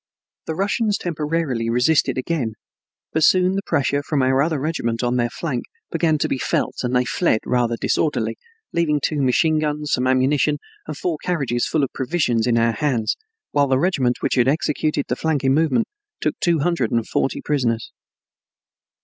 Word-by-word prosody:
The 160 - -2
Russians 205 +3 0
temporarily 150 - -2
resisted 130 +3 +2
again, 130 -4 -1 0.6
but 160 - +2
soon 185 +3 +4
the 195 - -1
pressure 140 +1 0
from 145 -2 0
our 130 +1 +3
other 155 0 0
regiment 125 -6 -2
on 120 0 +1
their 120 -1 +1
flank 135 -1 -3 0.3
began 160 -2 +2
to - - 0
be 130 - -2
felt - - -1
and 125 0 -1
they 125 0 +3
fled 125 -4 +1
rather 120 -2 +1
disorderly, 155 +5 0 0.4
leaving 155 -3 +1
two 145 +1 -1
machine 155 +5 +3
guns, 150 -1 -2
some 125 0 +1
ammunition, 135 +3 +2 0.3
and 155 -2 -5
four 165 -4 -2
carriages 135 -9 -1
full 155 - +1
of 135 - -2
provisions 125 -5 0
in 120 -1 +3
our 115 0 +3
hands, 125 -7 0 0.4
while 145 -1 +3
the 130 -1 +2
regiment 135 -6 +1
which - - +1
had 125 -1 +3
executed 150 0 0
the 125 - -1
flanking 140 -3 +1
movement 160 - +2 0.3
took - - 0
two 170 -4 +2
hundred 165 -8 +1
and 115 -1 0
forty - - -1
prisoners. 120 -6 -1
145 Hz, 175 wpm, -21 LUFS, 125-160 Hz, 0.6 s, soon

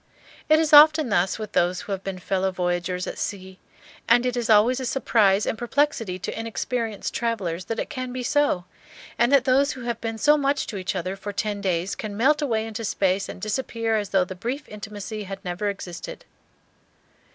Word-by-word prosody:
It 310 - +7
is 315 -1 +1
often 305 -1 +8
thus 190 -2 +1
with 215 -2 -6
those 175 +1 +1
who - - -8
have 195 -1 -3
been 195 -1 -4
fellow 190 +1 -1
voyagers 180 0 -2
at - - -6
sea; 190 -2 -5 0.5
and 245 - +5
it 250 -1 0
is 240 -2 -2
always 225 +4 +5
a 260 - -3
surprise 210 -7 +2
and - - -1
perplexity 240 -5 0
to 195 +4 -5
inexperienced 225 -1 -3
travellers 190 -7 -2
that 225 - -3
it - - -4
can 255 -3 -4
be 255 0 -4
so, 285 -10 +1 0.5
and 240 +2 +3
that 280 -2 +5
those 270 +2 +3
who 260 - -9
have 235 -2 -3
been 225 -1 -3
so 300 +5 +4
much 280 0 0
to 205 - -6
each 190 +1 -3
other 185 +1 -3
for 195 +1 -6
ten 205 0 -3
days 185 -1 -1
can 210 -2 -6
melt 295 +6 +3
away 225 -6 0
into 225 +1 -6
space 195 -2 0
and - - -7
disappear 230 0 -1
as 205 -3 -1
though 190 -2 +2
the 185 - -7
brief 245 +10 -5
intimacy 210 0 -7
had 195 +1 -8
never 180 +4 -2
existed. 185 -3 -7
215 Hz, 200 wpm, -24 LUFS, 190-250 Hz, 0.5 s, often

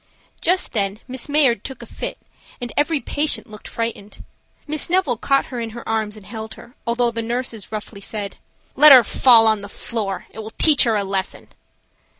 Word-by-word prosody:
Just 365 +2 +1
then 200 -2 -1
Miss 260 +1 -6
Mayard 275 -8 +2
took 265 - -8
a - - -9
fit - - -6 0.4
and 245 -2 -5
every 295 +1 +1
patient 295 +2 -2
looked 210 -2 -11
frightened. 230 -3 -6 0.4
Miss 305 0 -2
Neville 355 -8 +1
caught 275 +4 +1
her 245 - -3
in 230 -1 -4
her 235 - -9
arms 220 -1 -2
and 205 - -14
held 220 +1 -8
her, 240 - -15
although 235 0 +1
the 230 0 -3
nurses 230 -2 -4
roughly 210 -1 -7
said: 200 -1 -6 0.4
"Let 300 +2 +9
her 255 -3 +10
fall 230 0 +5
on 220 -2 +3
the 200 - -9
floor 205 -4 -4
and - - -24
it - - -6
will 220 +1 -9
teach 300 -5 +6
her 230 -2 +1
a 205 - 0
lesson." 195 -1 -3
230 Hz, 195 wpm, -20 LUFS, 215-265 Hz, 0.4 s, her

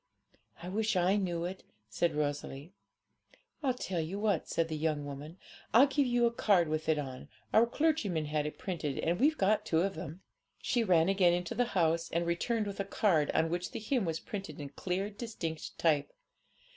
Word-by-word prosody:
'I 180 - -5
wish 215 +2 0
I 180 +2 +3
knew 175 -4 -1
it,' 185 +2 -5 0.3
said 165 +9 0
Rosalie. 145 +2 -3 0.9
'I'll 265 -4 +1
tell 185 -8 -3
you 165 +5 -4
what,' 205 -5 0
said 165 -1 +1
the 160 - -3
young 150 -1 -1
woman, 145 +4 -8 0.4
'I'll 250 +4 +9
give 280 -1 +1
you 240 -1 +3
a 235 - +3
card 185 -8 +3
with 155 0 -2
it 155 - +3
on; 130 -3 -6 0.2
our 230 +2 +6
clergyman 235 - 0
had 150 0 -1
it 150 - -7
printed, 155 -7 -3
and 170 +2 0
we've 305 +4 +3
got 205 +2 +2
two 160 0 +1
of 195 +2 0
them.' 160 +1 -7 0.4
She 240 -2 +1
ran 175 -5 +4
again 190 -3 +4
into 175 0 -2
the 245 - +2
house, 165 0 +2
and 170 +1 0
returned 210 +6 0
with 200 -1 -6
a - - +1
card, 190 -6 +2
on 160 0 +2
which 175 +1 -2
the - - -3
hymn 225 0 0
was 165 -1 -2
printed 195 -8 -7
in 145 -1 -6
clear, 190 +7 -3
distinct 200 -8 -5
type. 150 -4 +2
175 Hz, 195 wpm, -32 LUFS, 160-205 Hz, 0.9 s, I'll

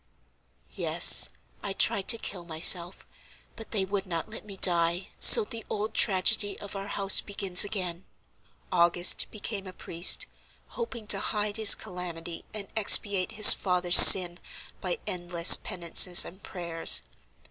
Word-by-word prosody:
"Yes, - - +4 0.3
I 200 - -9
tried 195 0 -3
to 230 - +2
kill 190 -5 -11
myself; 170 +2 -1 0.5
but 225 - -16
they 200 -4 -6
would 195 0 -9
not 170 -2 -9
let 220 - -13
me 200 -2 -13
die, 175 0 -2
so 465 - +6
the 230 - -12
old 215 +1 -8
tragedy 205 +1 -2
of 200 0 -14
our 195 0 -11
house 195 -1 0
begins 195 -3 0
again. 185 -4 -9 0.7
August 175 0 -2
became 205 -2 -11
a 185 - -14
priest, 170 0 -1 0.4
hoping 240 - -11
to - - 0
hide 210 0 -7
his 220 -2 +3
calamity 175 -2 -11
and 205 -2 -11
expiate 205 -2 0
his 215 -1 +7
father's 180 -2 +1
sin 175 -2 +7 0.4
by - - -7
endless 175 -1 +2
penances 175 0 +1
and 190 +3 -17
prayers. 170 -4 -2
190 Hz, 140 wpm, -22 LUFS, 175-205 Hz, 0.7 s, his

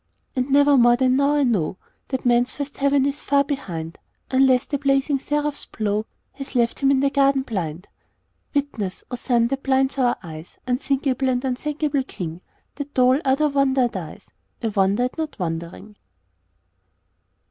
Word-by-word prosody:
And 255 +1 -1
never 285 0 +5
more 240 0 +6
than 255 0 +2
now 280 +2 +3
I 290 - +3
know 195 - 0 0.3
That 260 -2 -3
man's 245 +1 +3
first 285 -1 -6
heaven 280 -1 +2
is 280 +1 -2
far 280 0 +3
behind; 170 - -5 0.3
Unless 260 0 +4
the 285 - -3
blazing 275 0 +1
seraph's 295 +1 -2
blow 215 0 -2 0.2
Has 275 -1 -9
left 235 -1 +1
him 275 - +3
in 270 -1 +3
the 280 0 +2
garden 275 -1 +3
blind. 180 - -4 0.7
Witness, 235 -10 -2
O - - -2
Sun 235 -1 +1
that 275 0 -2
blinds 270 0 +1
our 245 -2 +2
eyes, 160 -1 -10
Unthinkable 265 +1 0
and 250 +1 0
unthankable 290 +2 -1
King, 175 -9 -6 0.4
That 285 0 -7
though 255 -1 +5
all 275 - +1
other 275 +3 +2
wonder 275 -2 +2
dies 185 -8 -8 0.3
I 225 - +1
wonder 200 +2 +2
at 255 +6 -3
not 315 -1 -4
wondering. 170 +3 -5
265 Hz, 165 wpm, -22 LUFS, 230-280 Hz, 0.7 s, more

